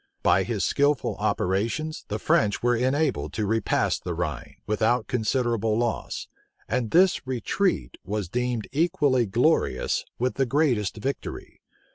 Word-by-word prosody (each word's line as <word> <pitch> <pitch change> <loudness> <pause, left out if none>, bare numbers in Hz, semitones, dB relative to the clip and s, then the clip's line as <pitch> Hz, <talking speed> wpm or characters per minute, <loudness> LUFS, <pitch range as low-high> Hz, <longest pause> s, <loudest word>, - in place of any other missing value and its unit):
By - - +4
his - - -1
skilful 145 0 +1
operations, 115 - -1
the 105 - -2
French 105 -1 +1
were 120 0 +3
enabled 130 +4 0
to 110 - -1
repass 110 +2 +1
the 90 -2 -4
Rhine, 75 -7 -4
without 110 +3 +1
considerable 115 -2 0
loss; 120 -1 -2 0.4
and 125 -3 -1
this 180 - +3
retreat 130 - -1
was 105 -2 -3
deemed 125 +2 -2
equally 145 - +2
glorious 115 - +1
with 125 +1 -1
the 135 -1 +2
greatest 125 -8 +1
victory. 135 +5 -5
120 Hz, 130 wpm, -25 LUFS, 105-135 Hz, 0.4 s, By